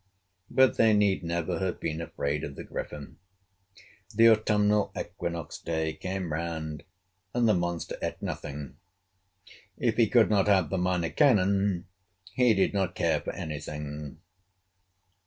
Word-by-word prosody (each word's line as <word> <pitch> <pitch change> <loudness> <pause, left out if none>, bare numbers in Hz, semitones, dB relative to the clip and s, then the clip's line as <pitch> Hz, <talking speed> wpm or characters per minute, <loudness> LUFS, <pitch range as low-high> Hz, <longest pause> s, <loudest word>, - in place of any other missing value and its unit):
But 130 +1 +4
they 110 -1 +5
need 100 -3 +2
never 85 0 -2
have 95 -1 -2
been 80 0 -3
afraid 75 -2 -3
of 70 - -6
the - - -7
Griffin. 75 -1 -7 1.0
The 115 +1 +7
autumnal 105 -1 +2
equinox 85 -1 -5
day 80 -1 -2
came 90 0 -4
round, 80 -2 -4 0.5
and 120 -1 +3
the 110 - +5
monster 85 -2 -2
ate - - -3
nothing. 75 -1 -6 1.0
If - - 0
he - - +5
could - - +4
not 100 -1 +3
have 95 -6 +3
the 95 - 0
Minor 90 -2 0
Canon, 100 -6 +3 0.5
he 125 -3 +4
did 95 - +2
not 95 -3 -1
care - - +1
for - - -4
any 75 -2 -5
thing. 75 0 -7
90 Hz, 140 wpm, -28 LUFS, 80-105 Hz, 1.0 s, The